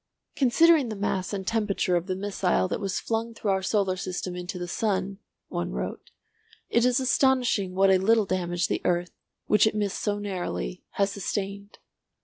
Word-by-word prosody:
"Considering 290 Hz, +1 st, +4 dB
the 215 Hz, -, -4 dB
mass 195 Hz, -2 st, -2 dB
and 195 Hz, -2 st, -4 dB
temperature 205 Hz, -4 st, 0 dB
of 175 Hz, +1 st, -1 dB
the 185 Hz, -, -1 dB
missile 190 Hz, -2 st, 0 dB
that -, -, -3 dB
was 195 Hz, -3 st, -2 dB
flung 230 Hz, 0 st, -2 dB
through 210 Hz, -3 st, -1 dB
our 190 Hz, 0 st, +1 dB
solar 190 Hz, -1 st, +1 dB
system 185 Hz, -1 st, -4 dB
into 180 Hz, +1 st, -5 dB
the 175 Hz, 0 st, -4 dB
sun," 195 Hz, 0 st, -1 dB, 0.3 s
one 85 Hz, -4 st, -3 dB
wrote, 60 Hz, 0 st, -5 dB, 0.6 s
"it 235 Hz, -, +3 dB
is 250 Hz, +1 st, +3 dB
astonishing 250 Hz, -7 st, +2 dB
what 195 Hz, 0 st, +5 dB
a 190 Hz, -, +5 dB
little 220 Hz, +2 st, +3 dB
damage 175 Hz, -2 st, -1 dB
the -, -, -1 dB
earth, 175 Hz, 0 st, 0 dB, 0.3 s
which 210 Hz, +1 st, +4 dB
it 215 Hz, -, -1 dB
missed 205 Hz, -2 st, -1 dB
so 205 Hz, -1 st, 0 dB
narrowly, 175 Hz, -, -4 dB
has 200 Hz, 0 st, +1 dB
sustained. 200 Hz, +1 st, -4 dB
195 Hz, 175 wpm, -26 LUFS, 185-215 Hz, 0.6 s, what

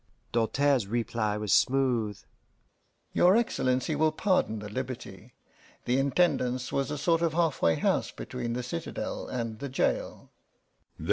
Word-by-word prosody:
Doltaire's 125 Hz, +1 st, +2 dB
reply 110 Hz, -1 st, -1 dB
was 105 Hz, -2 st, 0 dB
smooth: 120 Hz, -6 st, +2 dB, 0.9 s
"Your 185 Hz, +4 st, +5 dB
Excellency 140 Hz, -, 0 dB
will 155 Hz, +1 st, +3 dB
pardon 155 Hz, -, +1 dB
the 105 Hz, 0 st, -6 dB
liberty. 120 Hz, -2 st, -7 dB, 0.5 s
The 125 Hz, +2 st, +2 dB
Intendance 130 Hz, -4 st, +1 dB
was 140 Hz, +1 st, 0 dB
a 150 Hz, -, -3 dB
sort 165 Hz, +3 st, +2 dB
of 165 Hz, -2 st, +1 dB
halfway 155 Hz, -, +2 dB
house -, -, +1 dB
between 120 Hz, -2 st, -5 dB
the 125 Hz, +1 st, -3 dB
citadel 120 Hz, -9 st, -4 dB
and 115 Hz, -3 st, -4 dB
the 140 Hz, -, -5 dB
jail." 130 Hz, -, -1 dB
125 Hz, 130 wpm, -28 LUFS, 115-145 Hz, 0.9 s, Your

